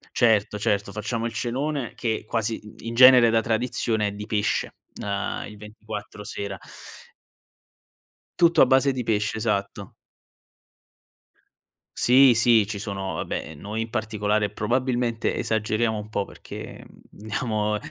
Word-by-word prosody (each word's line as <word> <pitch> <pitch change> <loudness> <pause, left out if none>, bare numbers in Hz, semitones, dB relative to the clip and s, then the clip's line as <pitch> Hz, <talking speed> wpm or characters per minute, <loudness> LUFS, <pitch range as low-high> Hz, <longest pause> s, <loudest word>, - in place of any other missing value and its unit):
Certo, 105 -3 +3
certo, 100 0 -1
facciamo 115 +3 -3
il 115 - -4
cenone 130 +3 -2
che 110 -3 -2
quasi 115 -1 -1
in 105 +1 -13
in 115 - -4
genere 125 -1 +8
da 115 0 +3
tradizione 110 -2 0
è - - -5
di 105 +1 -7
pesce, 105 -2 -1 0.3
ehm, 100 0 -3
il 105 - -10
24 105 0 -9
sera. 100 -2 -5 1.8
Tutto 170 0 +5
a - - +6
base 135 +1 +3
di 130 -1 -3
pesce, 110 -1 0
esatto. 100 -2 -2 2.0
Sì, 130 0 +6
sì, 115 -2 +4
ci 105 -2 -4
sono, 100 -2 -4
vabbè, 80 - -4
noi 105 +9 -5
in 115 0 -4
particolare 105 -2 -1
probabilmente 120 +1 -1
esageriamo 110 0 0
un 105 0 -7
po' 100 -2 -2
perché - - -10 0.3
diamo 105 0 -2
110 Hz, 130 wpm, -24 LUFS, 105-120 Hz, 2.0 s, genere